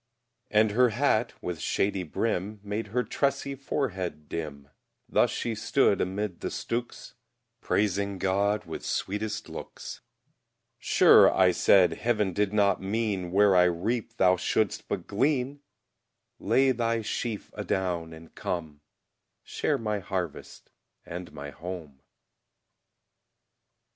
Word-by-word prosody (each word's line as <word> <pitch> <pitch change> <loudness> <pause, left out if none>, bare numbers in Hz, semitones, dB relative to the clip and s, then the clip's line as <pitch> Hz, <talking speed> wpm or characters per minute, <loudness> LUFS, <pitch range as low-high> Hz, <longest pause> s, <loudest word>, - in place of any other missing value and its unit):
And 110 0 +3
her 125 +3 +4
hat, 120 -1 +1
with 90 -3 -4
shady 95 +3 0
brim, 100 +3 -2
Made 105 +2 -3
her 125 +4 0
tressy 140 +1 -1
forehead 95 - -3
dim; 75 -4 -6 0.4
Thus - - +3
she 115 - -2
stood 110 0 +2
amid 95 0 -2
the - - -3
stooks, 120 +1 -4 0.5
Praising 100 -1 0
God 100 +2 +1
with 80 - -7
sweetest 105 +2 -3
looks: - - -8 0.8
Sure, - - +6
I 95 -1 +4
said, 90 0 +5
Heav'n 105 -5 0
did 100 +1 +1
not 100 -3 +2
mean, 100 -3 -1
Where 100 0 +5
I 90 0 +6
reap, 110 +7 -1
thou 90 0 +4
shouldst 100 +3 0
but 95 -4 -3
glean; 135 +5 0 0.8
Lay 135 0 +3
thy 115 -2 0
sheaf 110 0 -4
adown 85 -3 -2
and 80 0 -13
come, 80 -4 -4 0.6
Share - - -1
my 105 -2 -2
harvest 90 -4 -5 0.3
and 90 0 -7
my 70 0 -8
home. 80 -6 -8
100 Hz, 120 wpm, -28 LUFS, 90-110 Hz, 0.8 s, Sure